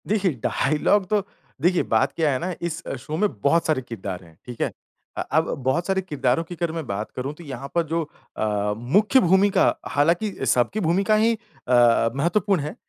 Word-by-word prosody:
देखिए 200 Hz, -3 st, +1 dB
डायलॉग 155 Hz, -, +1 dB
तो 210 Hz, -2 st, +1 dB, 0.4 s
देखिए 175 Hz, +3 st, +3 dB
बात -, -, +3 dB
क्या 160 Hz, -3 st, +2 dB
है 130 Hz, -, 0 dB
ना 180 Hz, +4 st, -3 dB
इस 170 Hz, -1 st, -3 dB, 0.2 s
शो 155 Hz, +5 st, -5 dB
में 210 Hz, +3 st, +2 dB
बहुत 165 Hz, +7 st, +3 dB
सारे 155 Hz, -4 st, +1 dB
किरदार 95 Hz, -7 st, -6 dB
हैं, 80 Hz, -2 st, -18 dB
ठीक 120 Hz, -2 st, -8 dB
है। -, -, 0 dB, 0.5 s
अ -, -, 0 dB
अब 160 Hz, +2 st, +2 dB
बहुत 160 Hz, +7 st, 0 dB
सारे 190 Hz, 0 st, +1 dB
किरदारों 145 Hz, -5 st, 0 dB
की 175 Hz, +2 st, -9 dB
अगर 170 Hz, -1 st, -2 dB
मैं 165 Hz, -2 st, -4 dB
बात 100 Hz, +2 st, -3 dB
करूँ 135 Hz, +3 st, -3 dB
तो 170 Hz, -, -12 dB
यहाँ 135 Hz, -3 st, -7 dB
पर 170 Hz, -, +3 dB
जो 165 Hz, +2 st, -1 dB, 0.4 s
अ, 105 Hz, -1 st, 0 dB
मुख्य 200 Hz, -, +3 dB
भूमिका 190 Hz, 0 st, +3 dB
हालाँकि 170 Hz, +9 st, +1 dB
सबकी 125 Hz, -, +2 dB
भूमिका 195 Hz, +4 st, +2 dB
ही 225 Hz, +2 st, +3 dB, 0.3 s
अ, 120 Hz, -2 st, +4 dB
महत्वपूर्ण 175 Hz, +4 st, +1 dB
है। 150 Hz, +2 st, -5 dB
160 Hz, 190 wpm, -23 LUFS, 125-190 Hz, 0.5 s, अ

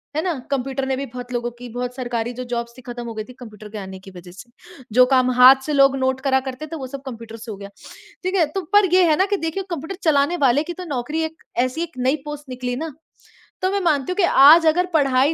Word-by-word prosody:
है 310 Hz, -, +1 dB
ना? 360 Hz, -2 st, 0 dB, 0.2 s
कंप्यूटर 270 Hz, 0 st, -2 dB
ने 265 Hz, -, 0 dB
भी 275 Hz, -, -3 dB
बहुत 245 Hz, 0 st, -9 dB
लोगों 240 Hz, 0 st, -2 dB
की, 240 Hz, +1 st, -11 dB
बहुत 245 Hz, +1 st, -5 dB
सरकारी 240 Hz, -2 st, -3 dB
जो 255 Hz, +1 st, -6 dB
जॉब्स 235 Hz, 0 st, -3 dB
थी -, -, -11 dB
ख़त्म 240 Hz, -1 st, -7 dB
हो 230 Hz, -, -5 dB
गई 215 Hz, -1 st, -5 dB
थी, 250 Hz, -, -13 dB
कंप्यूटर 215 Hz, -3 st, -11 dB
के 215 Hz, -, -8 dB
आने 190 Hz, -2 st, -8 dB
की 195 Hz, +1 st, -13 dB
वज़ह 180 Hz, -1 st, -12 dB
से, 195 Hz, +7 st, -13 dB, 0.4 s
जो 250 Hz, +3 st, +6 dB
काम 255 Hz, 0 st, +3 dB
हाथ 265 Hz, +2 st, +8 dB
से 300 Hz, -, -2 dB
लोग 275 Hz, -1 st, +5 dB
नोट 260 Hz, 0 st, 0 dB
करा 265 Hz, -1 st, +2 dB
करते 265 Hz, +4 st, -7 dB
थे 325 Hz, -, -7 dB
वो 265 Hz, -3 st, -6 dB
सब 275 Hz, +1 st, -8 dB
कंप्यूटर 230 Hz, -3 st, -8 dB
से 225 Hz, 0 st, -8 dB
हो 205 Hz, -, -7 dB
गया, 200 Hz, 0 st, -9 dB, 0.5 s
ठीक 370 Hz, +2 st, -1 dB
है? 340 Hz, -, +4 dB
तो 345 Hz, +6 st, -4 dB
पर 410 Hz, -1 st, +6 dB
ये 370 Hz, 0 st, +6 dB
है 310 Hz, -, +4 dB
ना 380 Hz, -, +3 dB
कि -, -, +2 dB
देखिए 325 Hz, +3 st, -3 dB
कंप्यूटर 335 Hz, +2 st, -5 dB
चलाने 310 Hz, +2 st, +2 dB
वाले 265 Hz, +5 st, +2 dB
की 345 Hz, -, -6 dB
तो 365 Hz, +1 st, -8 dB
नौकरी 295 Hz, +2 st, -3 dB
एक 320 Hz, 0 st, -6 dB, 0.2 s
ऐसी 255 Hz, +6 st, -3 dB
एक 335 Hz, -6 st, -9 dB
नई 255 Hz, +3 st, +1 dB
पोस्ट 295 Hz, -1 st, -8 dB
निकली 250 Hz, -1 st, -4 dB
ना, 315 Hz, +3 st, -5 dB, 0.7 s
तो 370 Hz, -, +1 dB
मैं 400 Hz, -, 0 dB
मानती 300 Hz, -3 st, +1 dB
हूँ -, -, -2 dB
कि 400 Hz, -, +2 dB
आज 325 Hz, +1 st, +7 dB
अगर 355 Hz, +3 st, +3 dB
पढ़ाई 275 Hz, -1 st, +3 dB
265 Hz, 265 wpm, -21 LUFS, 245-315 Hz, 0.7 s, हाथ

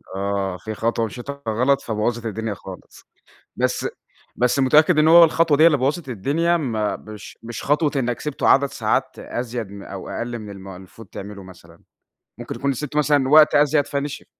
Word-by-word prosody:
آه، 95 Hz, -1 st, -2 dB
في 110 Hz, +3 st, -7 dB
خطوة 115 Hz, +1 st, -1 dB
مشيتها 135 Hz, +6 st, -8 dB
غلط 125 Hz, +5 st, +2 dB
فبوظت 115 Hz, +1 st, -2 dB
الدنيا 110 Hz, 0 st, -3 dB
خالص. 95 Hz, -2 st, -12 dB, 0.5 s
بس -, -, -1 dB, 0.5 s
بس 125 Hz, +2 st, +1 dB
متأكد 155 Hz, +5 st, +4 dB
إن 155 Hz, +1 st, +5 dB
هو 170 Hz, +1 st, +9 dB
الخطوة 165 Hz, -1 st, +2 dB
دي 155 Hz, -, +3 dB
هي -, -, +8 dB
اللي 155 Hz, -4 st, +4 dB
بوظت 140 Hz, +4 st, -1 dB
الدنيا، 145 Hz, -, 0 dB
ما 110 Hz, -9 st, -2 dB
مش 105 Hz, -1 st, -12 dB
مش 115 Hz, -1 st, -7 dB
خطوة 150 Hz, +1 st, +2 dB
إنك 125 Hz, -3 st, -1 dB
سِبته 150 Hz, -2 st, -2 dB
عدد 140 Hz, +1 st, +5 dB
ساعات 130 Hz, +1 st, -2 dB
أزيد 120 Hz, -3 st, -5 dB
م 100 Hz, 0 st, -10 dB
أو 95 Hz, -1 st, -8 dB
أقل 120 Hz, 0 st, -4 dB
من 105 Hz, -2 st, -9 dB
الم 95 Hz, -1 st, -10 dB
المفروض 95 Hz, +3 st, -12 dB
تعمله 100 Hz, +1 st, -9 dB
مثلًا؟ 85 Hz, -3 st, -16 dB, 0.6 s
ممكن -, -, -6 dB
يكون 140 Hz, 0 st, -1 dB
سِبته 150 Hz, +3 st, -4 dB
مثلًا 145 Hz, -3 st, +2 dB
وقت 150 Hz, +2 st, +6 dB
أزيد، 145 Hz, 0 st, +3 dB
فنشف. 140 Hz, 0 st, -4 dB
120 Hz, 180 wpm, -21 LUFS, 105-145 Hz, 0.6 s, هو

